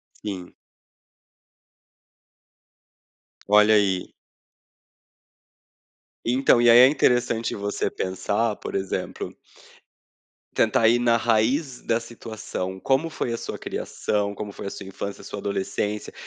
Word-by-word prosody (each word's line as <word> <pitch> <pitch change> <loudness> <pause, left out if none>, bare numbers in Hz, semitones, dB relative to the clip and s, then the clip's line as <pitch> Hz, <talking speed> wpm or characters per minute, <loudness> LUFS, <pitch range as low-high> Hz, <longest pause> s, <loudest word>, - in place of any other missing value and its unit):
Sim. 95 -4 -7 2.9
Olha 105 +1 +6
aí. 95 -3 +1 2.1
Então, 125 0 +3
e 120 - +5
aí, 120 +1 +9
é 130 - +10
interessante 125 -4 +1
você 100 0 -2
pensar, 100 +4 -1
por - - -7
exemplo 95 -1 -3 1.2
tentar 110 - +3
ir 120 +1 +4
na 120 -1 +3
raiz 120 +5 +1
da 115 +1 0
situação, 110 -5 -6
como 135 +5 +1
foi 120 -6 -3
a - - -1
sua - - -6
criação, 100 -1 -2
como 105 0 -6
foi 100 - -8
a - - -3
sua 100 - -8
infância, 100 +1 -6
sua 105 - -7
adolescência, 100 +1 -3
110 Hz, 110 wpm, -24 LUFS, 100-120 Hz, 2.9 s, é